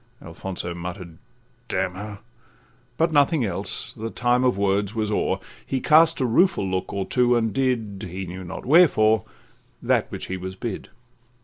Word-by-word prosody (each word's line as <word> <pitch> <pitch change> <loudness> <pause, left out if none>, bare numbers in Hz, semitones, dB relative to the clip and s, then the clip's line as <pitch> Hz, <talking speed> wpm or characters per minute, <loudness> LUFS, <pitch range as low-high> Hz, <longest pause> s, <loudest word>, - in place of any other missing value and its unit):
'—Alfonso 85 +1 -6
mutter'd, 85 -1 -7 0.5
'D—n 95 0 -1
her,' 100 +2 -8 0.8
But 165 0 +2
nothing 145 -2 +3
else, 90 -4 -2
the 115 +1 -5
time 120 +2 +1
of 125 -6 +2
words 100 +1 0
was 110 -1 -1
o'er; - - 0 0.3
He 135 - -2
cast 160 +4 +5
a 130 - +1
rueful 125 - +3
look 95 0 -2
or 100 -1 -2
two, 125 -1 +2
and 115 -2 0
did, 115 -7 -1
He 95 +2 -5
knew 95 +1 -7
not 85 - -7
wherefore, 110 - +5 0.5
that - - +1
which - - -4
he 95 - -4
was 95 +1 -6
bid. 105 +1 -5
105 Hz, 165 wpm, -24 LUFS, 95-125 Hz, 0.8 s, cast